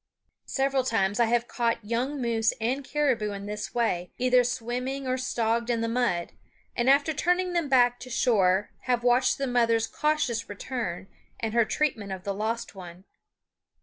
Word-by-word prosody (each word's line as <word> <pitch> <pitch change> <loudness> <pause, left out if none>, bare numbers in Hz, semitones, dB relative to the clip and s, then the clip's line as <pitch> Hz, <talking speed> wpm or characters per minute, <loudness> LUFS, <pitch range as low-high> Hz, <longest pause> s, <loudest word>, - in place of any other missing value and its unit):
Several 270 -1 +1
times 205 -4 0
I 235 - +5
have 240 +1 +1
caught 230 -3 -1
young 250 +6 -1
moose 230 -3 +1
and 255 +5 -1
caribou 265 -8 0
in 200 0 -6
this 210 +2 -5
way, 180 -7 0
either 250 0 +4
swimming 250 +3 -3
or 255 - +1
stogged 235 -2 -1
in 230 -1 +1
the 230 - 0
mud, 230 -8 0 0.4
and 240 +2 +2
after 285 +3 +4
turning 360 +4 +1
them 335 -4 0
back 245 -2 +4
to 255 - -9
shore 205 -6 +2
have 245 -1 +1
watched 245 +1 +3
the 275 - -1
mother's 230 -3 +2
cautious 285 -7 -1
return 205 -4 -4 0.3
and 220 -1 -3
her 235 -1 +4
treatment 220 -8 -1
of 190 -1 -6
the 200 - -2
lost 220 +3 -3
one. 180 -2 -11
240 Hz, 170 wpm, -27 LUFS, 220-260 Hz, 0.4 s, I